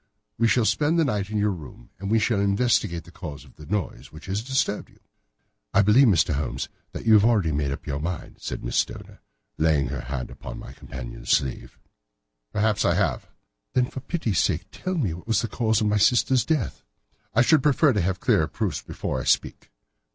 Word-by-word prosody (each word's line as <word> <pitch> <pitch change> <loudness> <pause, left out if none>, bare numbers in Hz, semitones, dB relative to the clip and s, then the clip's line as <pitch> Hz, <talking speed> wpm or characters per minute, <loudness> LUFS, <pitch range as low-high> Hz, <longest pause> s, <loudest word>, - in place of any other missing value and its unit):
"We 115 - +4
shall 115 -1 +3
spend 150 +8 +2
the 165 - +4
night 105 -6 -1
in 110 - -2
your 105 0 +2
room, 75 -9 -10
and 100 +1 -4
we 115 - +4
shall 110 -1 +1
investigate 100 -4 +1
the 85 - -15
cause 75 -7 -8
of - - -19
this 75 -1 -13
noise 105 -2 -3
which 80 - -12
has 95 +3 -2
disturbed 130 -4 -1
you." - - -24 0.8
"I 100 - +6
believe, 120 +7 +6
Mr. 80 -6 +3
Holmes, 70 -2 -3 0.2
that - - -7
you 110 - +5
have 105 -2 +7
already 105 -8 +3
made 70 -1 -1
up 70 - -6
your 70 -1 -3
mind," 85 +3 -5
said - - -5
Miss - - -2
Stoner, - - -3 0.4
laying 75 -5 +2
her 70 0 -4
hand 65 0 -5
upon - - -8
my 65 - -9
companion's 65 -3 -9
sleeve. 65 -2 0 0.7
"Perhaps 105 0 +1
I - - +3
have." - - 0 0.5
"Then, 125 - +3
for - - -5
pity's 130 - -1
sake, - - +1
tell 185 0 -4
me 115 - 0
what 90 +5 -10
was 115 - +2
the - - -1
cause 110 0 +1
of - - +1
my 105 0 +2
sister's 125 +3 +3
death." 140 - -1 0.5
"I 120 - +6
should 155 +2 +4
prefer 145 0 +4
to 105 - +1
have 90 +1 -1
clearer 100 -11 +2
proofs - - -2
before 65 - -4
I - - -7
speak." - - 0
100 Hz, 210 wpm, -25 LUFS, 80-115 Hz, 0.8 s, have